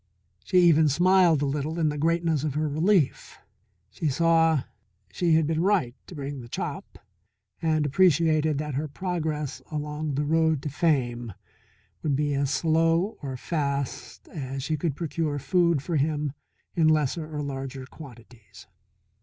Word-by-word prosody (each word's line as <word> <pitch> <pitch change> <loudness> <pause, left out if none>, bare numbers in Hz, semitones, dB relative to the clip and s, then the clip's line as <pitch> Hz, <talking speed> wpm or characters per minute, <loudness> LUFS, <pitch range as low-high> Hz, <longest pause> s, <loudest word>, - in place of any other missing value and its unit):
She 185 - +1
even 160 -3 +5
smiled 175 -1 +4
a - - +2
little 145 +3 -2
in 160 -2 +2
the 150 - -3
greatness 165 -1 +1
of 150 -3 -2
her 155 +1 0
relief. 160 +2 +1 0.5
She 155 +7 -2
saw 165 0 +3 0.5
she 170 -3 +2
had 160 -1 +3
been 160 +1 0
right 180 -10 +2
to 180 - -10
bring 140 -2 -5
the 120 - -11
chop, - - -5 0.6
and 155 -2 +1
appreciated 155 -1 +3
that 150 0 -3
her 145 +4 -2
progress 155 -3 -3
along 150 -1 -3
road 155 0 +1
to 150 - -2
fame 120 - 0 0.7
would 150 -3 0
be 145 +1 0
as 140 -1 0
slow 165 +5 +1
or 135 -3 -5
fast 140 -2 -3
as 135 -3 -5
she 155 - -1
could 150 -1 -2
procure 160 -2 -2
food 170 0 +1
for 170 -1 -1
him 145 -1 -1 0.4
in 165 -3 +3
lesser 155 +1 +1
or 150 -1 -3
larger 135 -1 -5
quantities. 120 - -14
150 Hz, 150 wpm, -26 LUFS, 140-165 Hz, 0.7 s, even